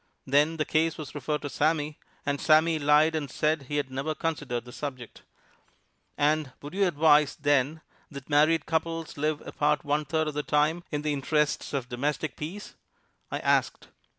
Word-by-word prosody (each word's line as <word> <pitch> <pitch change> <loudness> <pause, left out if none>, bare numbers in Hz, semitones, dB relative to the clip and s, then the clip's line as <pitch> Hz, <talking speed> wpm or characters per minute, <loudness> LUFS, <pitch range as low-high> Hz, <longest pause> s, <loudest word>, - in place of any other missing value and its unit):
Then 150 +4 +3
the 155 - 0
case 160 +1 +1
was 155 -3 -7
referred 150 +1 -3
to 145 - -3
Sammy, 150 -1 0 0.3
and 140 -1 -1
Sammy 160 +1 +4
lied 150 +2 +4
and 150 -3 -2
said 155 +4 0
he 145 - -2
had 140 -2 -2
never 140 +4 -2
considered 145 -8 -3
the 125 - -10
subject. 130 -4 -7 1.0
"And 150 -2 +1
would 145 +3 -9
you 195 0 +2
advise, 150 -2 +4
then, 145 +1 +1 0.3
that 140 -3 -9
married 150 +1 +3
couples 165 0 -2
live 150 +1 -1
apart 150 0 0
one 145 +1 0
third 155 +2 0
of 150 - -3
the 150 - -1
time, 150 +4 +1
in 150 -1 -3
the 150 -1 0
interests 145 +1 0
of 135 -4 -2
domestic 145 +5 -2
peace?" 170 +7 -7 0.6
I - - -2
asked. - - +1
150 Hz, 175 wpm, -27 LUFS, 145-155 Hz, 1.0 s, Sammy